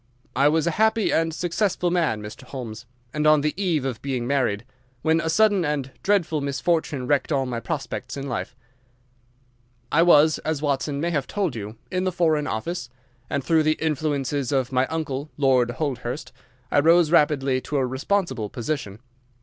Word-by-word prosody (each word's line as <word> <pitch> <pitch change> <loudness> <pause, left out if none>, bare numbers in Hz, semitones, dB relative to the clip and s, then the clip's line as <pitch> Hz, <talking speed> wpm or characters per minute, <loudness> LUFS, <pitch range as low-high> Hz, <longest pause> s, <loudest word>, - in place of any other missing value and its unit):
I 140 +2 +4
was 160 +1 +2
a 170 - +1
happy 220 0 +3
and 165 0 +2
successful 175 +2 0
man, 155 -12 0
Mr. 105 +4 -9
Holmes, 120 -3 -8 0.3
and 150 0 +1
on 155 -1 +6
the 150 +1 0
eve 170 -7 0
of 130 -4 -3
being 130 -3 -2
married, 125 -5 0 0.4
when 160 +1 +3
a 160 - -2
sudden 205 +1 +3
and 145 -3 -2
dreadful 175 -7 +1
misfortune 140 0 -1
wrecked 145 +3 +1
all 135 -2 +1
my 120 -2 -3
prospects 140 -1 -4
in 140 0 -4
life. 125 0 -4 1.4
"I 165 - +4
was, 155 -2 +5
as 155 -2 -2
Watson 140 -1 -1
may 170 +3 0
have 145 -5 -1
told 190 -10 -1
you, 105 0 -6 0.2
in 185 0 0
the 185 - +1
Foreign 160 -4 +1
Office, 120 +4 -3 0.4
and 140 - -1
through 160 +3 +3
the 155 0 +3
influences 145 -3 -1
of 130 -2 0
my 130 0 +2
uncle, 150 -3 -3
Lord 130 -4 +3
Holdhurst, 125 0 -4 0.4
I - - +4
rose 165 +1 +5
rapidly 140 -5 +3
to 145 - -3
a 135 - +2
responsible 130 - -1
position. 120 -4 -4
145 Hz, 175 wpm, -24 LUFS, 130-165 Hz, 1.4 s, on